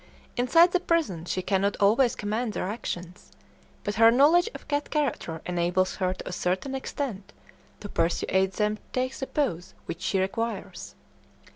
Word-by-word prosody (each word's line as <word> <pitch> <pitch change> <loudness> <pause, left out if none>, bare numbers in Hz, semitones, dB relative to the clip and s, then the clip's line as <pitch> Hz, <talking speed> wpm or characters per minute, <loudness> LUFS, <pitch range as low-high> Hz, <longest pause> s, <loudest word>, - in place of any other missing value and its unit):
Inside 330 +8 +5
the 365 - +2
prison 310 - 0
she 185 +1 -2
cannot 200 +1 +1
always 225 +5 +4
command 215 +2 -2
their - - -2
actions, 180 -4 -6 0.5
but 205 - -2
her 225 - +9
knowledge 300 - +5
of - - -10
cat 290 0 -1
character 240 - -2
enables 180 +1 0
her 185 -2 +1
to 185 - -7
a - - -4
certain 185 +9 -1
extent 265 -6 -4 0.5
to 205 - -6
persuade 190 +1 +1
them 210 +2 0
to - - -28
take 255 +1 -1
the 265 - -4
pose 205 - -2
which 165 +1 -6
she 190 - 0
requires. 225 +5 -3
210 Hz, 160 wpm, -27 LUFS, 185-265 Hz, 0.5 s, her